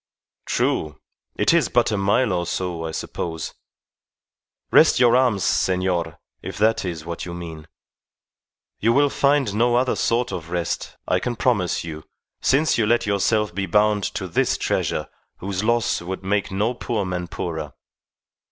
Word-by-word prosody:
"True. 75 -1 0 0.4
It - - +3
is - - +3
but - - +2
a - - +1
mile 100 +3 +2
or 85 -1 -1
so, 85 -2 -3
I - - -3
suppose. 80 0 -5 1.2
Rest - - +6
your 120 -1 +5
arms, 120 -7 +2
senor, 90 -3 0 0.2
if - - -7
that 110 +2 +2
is 85 -4 -5
what 85 0 -5
you 85 - -6
mean. 80 -3 -8 1.1
You 115 +2 +3
will 145 +1 +3
find 140 -6 +2
no 120 +3 +2
other 125 +1 +2
sort 120 0 0
of 85 -4 -6
rest, 85 -1 -3
I 90 - +2
can 120 +5 -3
promise 115 -9 +1
you, 80 -2 -7 0.4
since 140 0 +2
you 110 - +2
let 120 +1 +2
yourself 105 0 +1
be 95 +1 -2
bound 105 +2 +3
to 95 -2 -3
this 85 - +1
treasure - - -1 0.3
whose 95 +1 -3
loss 115 -3 +1
would 95 +2 -5
make 100 +1 0
no 105 +5 0
poor 115 -4 -2
man 90 -1 -3
poorer. 80 -3 -5
100 Hz, 160 wpm, -22 LUFS, 85-115 Hz, 1.2 s, Rest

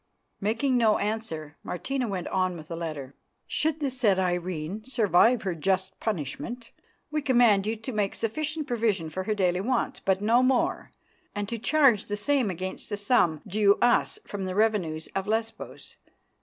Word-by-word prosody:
Making 235 +6 +1
no 225 -3 +4
answer, 200 -8 -4
Martina 255 +7 -3
went 185 -4 -3
on 185 -2 0
with 155 -1 -11
the 165 - -4
letter 155 -5 -5 0.3
"'Should 315 0 -1
the 280 -2 0
said 235 -7 +2
Irene 180 +1 -2
survive 235 -1 +3
her 190 -3 -1
just 190 +3 -1
punishment, 220 - -4 0.4
we 305 0 0
command 240 -7 +4
you 220 - 0
to 225 +4 -6
make 210 -3 -1
sufficient 305 +7 -2
provision 215 -10 0
for 185 +4 -4
her 215 - 0
daily 180 -2 +1
wants, 255 +3 -1
but 190 -1 +1
no 225 +4 +4
more, 255 -1 +1 0.5
and 205 0 -2
to 235 -1 -3
charge 265 -5 +4
the 205 - -3
same 255 +1 +1
against 185 +1 -5
the 205 - -2
sum 200 - +2
due 205 0 +3
Us 240 - +2
from 200 -2 -5
the 185 0 -3
revenues 195 -8 +1
of 195 0 -2
Lesbos. 225 +1 -4
210 Hz, 170 wpm, -27 LUFS, 185-240 Hz, 0.5 s, no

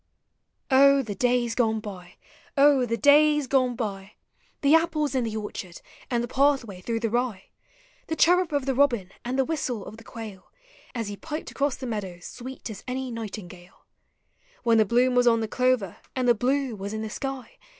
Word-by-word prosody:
O 275 +1 +6
the 215 -4 -5
davs 245 -1 +1
gone 220 -3 +1
by! 190 -4 -9 0.4
O 275 -3 +5
the 230 0 -1
days 295 +1 +5
gone 255 -2 +2
by! 205 -3 -5 0.5
The 285 +1 +4
apples 320 -3 +2
in 255 -3 +1
the 220 -1 -3
orchard, 190 -4 -6 0.3
and 240 -1 0
the - - -3
pathway 260 -8 +1
through 225 +3 -2
the 225 -2 -1
rye; 240 -5 -2 0.6
The 320 - -2
chirrup 355 +1 +4
of 285 -3 0
the 270 - +1
robin, 240 -9 +2
and 250 +2 -3
the 265 - +3
whistle 260 -9 -3
of 215 - -10
the 230 - -13
quail 220 -5 -10 0.4
As 230 -3 -3
he 205 - -6
piped 310 +4 -6
across 280 -1 0
the 260 - -7
meadows 195 -7 -5
sweet 260 +2 -8
as 210 - -9
any 255 0 -3
nightingale; 195 -5 -9 0.8
When 230 -2 +4
the 215 - +5
bloom 245 +4 +3
was 245 0 +3
on 230 -1 +5
the 220 - -2
clover, 250 -6 0 0.2
and 255 -1 0
the 240 - +7
blue 260 +1 0
was 200 +1 -6
in 220 0 -3
the 220 - -4
sky. 270 -2 -6
245 Hz, 190 wpm, -26 LUFS, 215-270 Hz, 0.8 s, the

